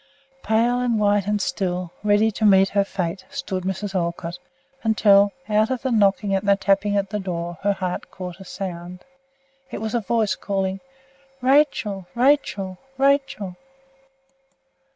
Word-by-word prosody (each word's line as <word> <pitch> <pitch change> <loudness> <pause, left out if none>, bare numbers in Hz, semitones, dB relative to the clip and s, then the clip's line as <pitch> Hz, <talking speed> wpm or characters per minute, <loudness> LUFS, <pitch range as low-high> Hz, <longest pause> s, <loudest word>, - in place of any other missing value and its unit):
Pale 235 +3 +2
and 240 -3 +1
white 205 -1 +2
and 210 0 +1
still, 180 -3 -2
ready 210 +1 +3
to 220 - -5
meet 195 -2 +6
her 200 0 +2
fate, 185 -2 -4
stood 185 -2 -4
Mrs. 190 +1 -3
Olcott, 170 -1 -3 0.4
until, 205 -2 +4 0.2
out 215 0 +2
of 260 -1 -3
the 260 - 0
knocking 200 -2 +2
and 195 +1 -1
the 200 - +6
tapping 200 +1 +1
at 200 -1 -1
her 210 - -2
door, 175 -3 -4
her 200 0 +2
heart 185 -2 -4
caught 180 -1 -8
a - - -9
sound. 180 -1 -7 0.6
It - - -5
was 220 0 -4
a 235 - +1
voice 220 -1 +1
calling, 195 -1 -2 0.6
"Rachel! 250 -8 +2
Rachel! 235 -8 +1 0.2
Rachel!" 270 -9 +1
200 Hz, 150 wpm, -23 LUFS, 190-220 Hz, 0.6 s, meet